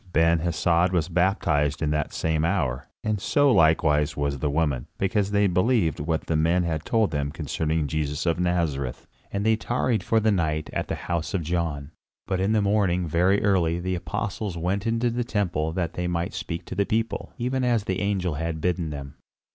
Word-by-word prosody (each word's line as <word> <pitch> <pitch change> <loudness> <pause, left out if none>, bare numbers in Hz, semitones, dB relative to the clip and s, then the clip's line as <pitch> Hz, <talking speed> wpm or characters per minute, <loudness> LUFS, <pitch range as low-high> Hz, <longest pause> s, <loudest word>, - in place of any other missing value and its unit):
Ben 80 +1 +4
Hesed 85 +1 +2
was 85 -2 0
baptized 85 -5 +1
in 75 -2 0
that 75 -1 -1
same 80 -1 0
hour, 75 -9 0 0.2
and 105 -2 -1
so 145 +3 +3
likewise 80 -6 +3
was 70 -1 -1
the 75 - 0
woman, 70 -4 0
because 100 +1 0
they 100 0 +3
believed 90 - +2
what 80 +2 -1
the 80 - -1
men 85 +3 +2
had 80 -3 -2
told 110 -3 +2
them 70 -2 -1
concerning 80 0 -1
Jesus 75 +2 -2
of 85 -1 +1
Nazareth; 80 -8 -1 0.3
and 100 +1 -2
they 110 0 +4
tarried 120 0 0
for 115 - +2
the 110 0 +2
night 80 -5 -1
at - - -2
the - - -2
house 85 +1 -2
of 90 - -1
John. 80 -3 -2 0.3
But 95 -2 -1
in 95 +3 +1
the 110 -2 +2
morning 95 -4 +1
very 90 +5 +2
early 85 -4 +2
the 95 +1 -2
Apostles 95 +2 -3
went 95 +5 -1
into 115 +1 +1
the 120 +1 -1
temple 90 -9 -1
that 85 -2 -2
they 90 0 -2
might 85 -1 -2
speak 85 -1 -5
to - - -7
the 100 - 0
people, 115 0 -1
even 125 +2 -1
as 120 -4 +2
the 95 -2 -2
angel 95 -4 0
had 80 +1 -3
bidden 85 -1 -1
them. 70 -2 -7
85 Hz, 195 wpm, -25 LUFS, 80-100 Hz, 0.3 s, Ben